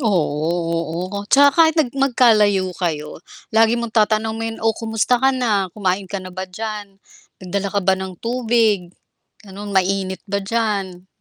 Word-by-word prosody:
Oo, 165 - 0 0.6
oo, 200 - -3
'tsaka 285 +1 +6
kahit 320 +1 +4
nag 280 -6 +1
magkalayo 220 -8 +3
kayo 155 -3 -3 0.3
lagi 225 +1 +4
mong 235 -1 -4
tatanungin, 220 +1 0
"Oh, 225 - +4
kumusta 225 +2 0
ka 265 - +4
na 210 -7 0
kumain 190 -1 -1
ka 200 - -4
na 185 -1 -8
ba 185 0 -6
diyan? 210 0 -6 0.5
Nagdala 200 +2 -2
ka 200 +1 -1
ba 190 - +4
ng 190 -1 -4
tubig?" 230 -4 +1 0.6
Gano'n. 200 +1 -8
Mainit 190 0 0
ba 200 0 -2
diyan? 195 -4 -2
205 Hz, 150 wpm, -20 LUFS, 190-225 Hz, 0.6 s, tsaka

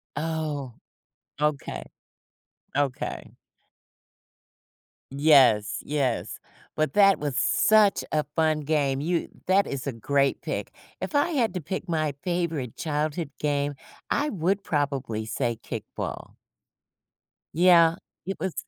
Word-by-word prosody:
Oh. 150 -5 -3 0.7
Okay. 150 -2 -1 0.9
Okay. 140 -3 -2 1.8
Yes, 135 -7 +4
yes. 140 -5 -1 0.4
But 155 0 0
that 195 -1 +5
was 145 -3 -2
such 215 +4 +4
a 150 - +1
fun 155 -2 +2
game. 140 -2 +1
You 170 +3 -1 0.2
that 195 +2 +3
is 140 0 -4
a 140 - -1
great 140 +4 +1
pick. - - -4 0.3
If - - -5
I 290 +3 +3
had 240 - +1
to 180 - -3
pick 185 +5 -5
my 155 -3 0
favorite 170 - -2
childhood 155 +1 -2
game, 145 -1 0 0.3
I 295 +1 +1
would 195 - 0
probably 135 -9 -1
say 120 0 -2
kickball. - - -6 1.2
Yeah. 170 -1 +6 0.3
It 195 - -4
was 190 -3 -2
150 Hz, 110 wpm, -26 LUFS, 140-175 Hz, 1.8 s, Yeah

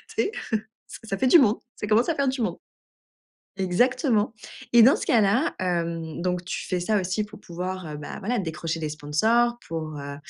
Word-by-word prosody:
tu - - +2
sais? 410 - -2 0.6
Ça - - -10
ça 195 - -1
fait 260 - +2
du 335 - +8
monde, 225 -4 +4 0.2
ça - - -4
commence 225 +7 +3
à 330 - +1
faire 280 -1 +1
du 260 -1 -1
monde. 225 - -1 1.0
Exactement 225 - +1 0.4
et 235 -1 +8
dans 260 +5 +7
ce - - -5
cas-là, 230 +5 +3
hem 170 -3 -2
donc 180 0 -1
tu 180 - -4
fais 180 -2 -1
ça 210 +3 +1
aussi 190 +3 -1
pour 210 +1 -13
pouvoir 180 -2 -5
bah, 145 - -7
voilà, 230 +5 -1
décrocher 165 -1 -3
des 155 - -2
sponsors, 220 +12 +1
pour 155 -2 -4
heu, 140 0 -6
190 Hz, 190 wpm, -25 LUFS, 165-235 Hz, 1.0 s, du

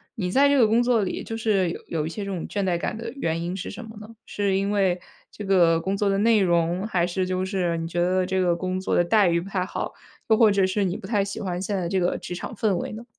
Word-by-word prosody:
你 180 -4 -2
在 275 +7 +5
这 285 0 +3
个 235 -4 +5
工 225 +2 +3
作 240 -2 +2
里 190 - -3
就 225 - -5
是 210 -5 +1
有 165 - -6
有 155 -2 -2
一 - - -4
些 205 +5 -5
这 200 - -4
种 180 -4 -4
倦 200 - -2
怠 180 -2 +1
感 210 - -3
的 230 0 -6
原 165 -11 -2
因 175 +2 -3
是 190 - -5
什 230 +4 -8
么 220 -1 -11
呢？ 215 +2 -11
是 200 -2 -1
因 195 +1 0
为 190 -3 +1 0.3
这 210 - -8
个 175 -4 +4
工 195 +3 -2
作 205 - +1
的 195 - +1
内 220 0 +4
容？ 175 +1 +1
还 180 -5 +1
是 185 +1 -1
就 185 0 -1
是 180 -3 -1
你 165 0 -3
觉 175 +1 -3
得 185 +1 +2
这 190 +1 -1
个 175 -2 +2
工 185 +1 -3
作 190 - -1
的 - - +4
待 205 +2 +4
遇 170 0 +1
不 190 - -9
太 185 -2 -1
好， - - -4 0.4
又 220 - +5
或 220 -2 +6
者 200 -1 +3
是 190 +2 0
你 180 0 -1
不 - - -8
太 205 -4 +1
喜 200 - -5
欢 180 -2 -3
现 200 +1 -2
在 180 -3 -2
这 190 +1 +1
个 175 0 0
职 - - -7
场 205 - -6
氛 210 -2 +1
围 - - -4
呢？ 225 +2 -8
190 Hz, 320 characters per minute, -24 LUFS, 175-210 Hz, 0.4 s, 或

